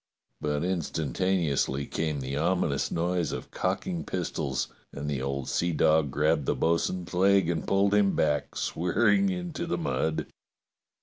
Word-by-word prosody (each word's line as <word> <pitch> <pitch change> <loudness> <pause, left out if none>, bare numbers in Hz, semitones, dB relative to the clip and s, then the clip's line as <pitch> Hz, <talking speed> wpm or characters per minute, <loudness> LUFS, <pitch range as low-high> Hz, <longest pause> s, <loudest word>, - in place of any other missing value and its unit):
But 75 0 -1
instantaneously 80 -4 0
came 75 -2 -2
the 65 +1 -3
ominous 80 -2 +1
noise 85 -1 0
of - - -6
cocking 165 - -2
pistols, 70 -7 -2 0.2
and 70 +1 -6
the 70 -3 -1
old 70 -1 -3
sea 85 0 0
dog 80 -1 +3
grabbed 75 +1 +1
the - - +2
bo'sun's 85 +2 0
leg 95 0 +4
and 80 -2 -3
pulled 100 +1 +3
him 100 -1 +3
back 75 -2 0
swear 90 +1 0
ing 200 0 +4
into 175 -2 -3
the - - -1
mud. 80 - -1
85 Hz, 145 wpm, -28 LUFS, 75-95 Hz, 0.2 s, leg